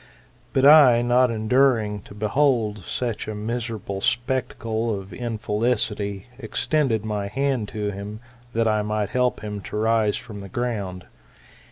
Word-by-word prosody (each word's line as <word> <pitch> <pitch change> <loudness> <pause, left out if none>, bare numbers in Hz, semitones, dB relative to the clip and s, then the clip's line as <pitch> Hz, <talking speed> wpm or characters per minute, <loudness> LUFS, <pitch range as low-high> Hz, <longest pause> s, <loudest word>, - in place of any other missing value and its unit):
But 135 - +2
I, 140 -6 +8
not 125 +1 +4
enduring 115 -2 +2
to 100 - -11
behold 110 -1 +1
such 115 +5 -3
a 110 - -4
miserable 110 -3 -4
spectacle 115 -3 -1
of 95 0 -11
infelicity, 105 -2 -1
extended 120 -1 0
my 105 -2 -2
hand 130 0 -1
to 105 -1 -3
him, 100 +2 -7 0.3
that 115 0 +2
I 110 -1 +2
might 105 -1 -1
help 125 -1 0
him 105 -1 -5
to 105 - -6
rise 110 -1 +2
from 110 -4 -9
the 100 - -9
ground. 100 -6 -3
110 Hz, 140 wpm, -24 LUFS, 105-125 Hz, 0.3 s, I